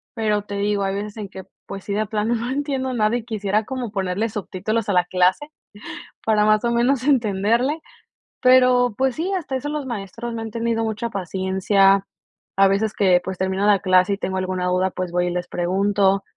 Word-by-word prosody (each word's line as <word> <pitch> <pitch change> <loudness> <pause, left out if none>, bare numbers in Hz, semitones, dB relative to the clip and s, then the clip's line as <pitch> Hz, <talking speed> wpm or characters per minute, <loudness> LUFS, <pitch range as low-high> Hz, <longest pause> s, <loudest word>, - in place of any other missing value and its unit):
pero 210 -3 0
te 205 0 -7
digo, 205 0 0
hay 195 0 -1
veces 205 +1 -5
en 210 -2 -5
que, 190 0 -9 0.2
pues 195 -1 -7
sí, 200 - -4
de 215 +2 0
plano 215 +3 -1
no 235 +2 -3
entiendo 270 -2 -2
nada 215 -1 +1
y 230 - -7
quisiera 210 -2 -1
como 255 -3 -4
ponerle 195 +2 -1
subtítulos 210 +1 -3
a - - +2
la 180 -1 +3
clase 185 +11 +1 0.8
para 215 -1 +3
más 215 +1 +3
o 235 - +1
menos 245 +2 +1
entenderle. 235 +2 +1 0.6
Pero, 250 -1 +5
pues 265 -2 +1
sí, 350 +5 -2
hasta 325 -8 -3
eso 275 +3 -3
los 300 -2 -3
maestros 230 +1 -5
me 225 - -4
han 225 - -6
tenido 230 0 -1
mucha 220 +1 -3
paciencia. 195 +1 +2 0.5
A 195 - +6
veces 200 +2 0
que, 185 -3 +3
pues, 190 -1 -5
termina 190 +1 -1
la 205 -2 +5
clase 185 +1 +3
y - - -2
tengo 190 0 -3
alguna 185 -1 -2
duda, 180 +1 +1
pues, 180 -1 -4
voy 180 0 0
y - - -1
les 175 0 -3
pregunto. 195 +2 +1
210 Hz, 200 wpm, -22 LUFS, 190-235 Hz, 0.8 s, A